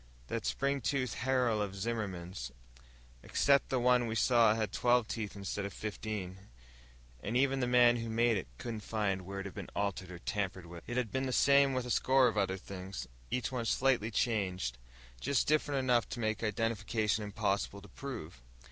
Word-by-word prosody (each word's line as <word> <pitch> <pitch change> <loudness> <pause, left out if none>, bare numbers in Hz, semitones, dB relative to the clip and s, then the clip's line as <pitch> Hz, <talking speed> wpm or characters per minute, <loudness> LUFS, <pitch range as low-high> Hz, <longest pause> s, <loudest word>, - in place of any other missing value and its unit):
"That - - -2
spring 140 0 0
toothed 130 +1 0
harrow 125 -4 +1
of 100 -1 -3
Zimmerman's." 95 -6 -4 0.7
"Except 140 - +3
the 130 - +1
one 125 0 +4
we 110 - -2
saw 115 -2 +5
had 110 -3 -1
twelve 120 -1 +3
teeth 110 -3 -4
instead 100 0 -4
of 100 -1 -5
fifteen. 105 -3 -5 0.8
And 115 +4 -1
even 135 0 +2
the 125 - +1
man 120 -1 +6
who 115 -1 -4
made 115 +1 +3
it 95 -9 -3
couldn't 115 - -5
find 105 -3 -1
where 95 +2 -5
it - - -8
had 95 - -6
been - - -7
altered 100 -2 -2
or 90 - -7
tampered 95 -1 -3
with." 85 0 -10
It 120 +2 -3
had 125 -4 0
been 130 0 -1
the - - -2
same 140 +1 +5
with 130 -1 -1
a 125 - -3
score 130 +1 +4
of 115 - -1
other 95 -2 +1
things. 95 -4 -7 0.2
Each 125 0 -1
one 125 -3 -2
slightly 125 -2 +2
changed, 95 - -1 0.4
just 140 -3 +1
different 145 -2 +2
enough 125 -3 +2
to 120 - -5
make 110 -1 -1
identification 110 -1 0
impossible 100 -1 -2
to - - -11
prove. 105 - -7
110 Hz, 185 wpm, -33 LUFS, 100-125 Hz, 0.8 s, man